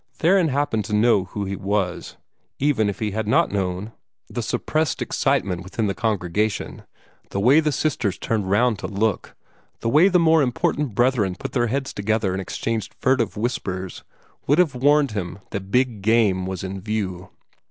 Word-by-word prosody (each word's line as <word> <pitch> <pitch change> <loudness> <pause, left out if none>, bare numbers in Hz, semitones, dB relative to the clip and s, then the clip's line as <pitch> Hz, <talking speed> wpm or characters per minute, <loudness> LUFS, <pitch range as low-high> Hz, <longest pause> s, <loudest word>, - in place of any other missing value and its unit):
Theron 180 +1 +3
happened 140 -6 0
to 105 - -1
know 105 -3 +3
who 100 +2 -5
he 100 +1 -3
was; 95 -2 -2 0.4
even 130 -7 +2
if 100 - -4
he 110 -2 -2
had 110 +1 -3
not 110 - +3
known, 95 +1 -2 0.4
the - - -4
suppressed 155 -1 -1
excitement 90 -2 0
visible 95 +5 -12
in - - +2
the 100 - 0
congregation, 105 0 -2 0.4
the 100 - -3
way 130 +9 +5
the 155 -1 +1
sisters 125 -8 -1
turned 105 -4 -2
round 110 +2 +2
to - - -4
look, 105 -1 -2 0.5
the 115 - 0
way 155 +9 +6
the 185 -2 +4
more 165 -2 +4
important 130 -1 0
brethren 120 -6 +2
put - - -6
their 120 -2 +1
heads 135 +3 -2
together 105 -1 0
and 95 - -2
exchanged 110 +3 -3
furtive 130 -6 +1
whispers 95 -5 -3 0.4
would 145 - +4
have 175 -6 +3
warned 145 +1 +3
him 95 -4 -4
that 95 -1 -5
big 125 -2 +1
game 100 -4 +2
was 95 -1 -4
in 95 0 -5
view. 95 -3 -3
110 Hz, 175 wpm, -22 LUFS, 95-130 Hz, 0.5 s, way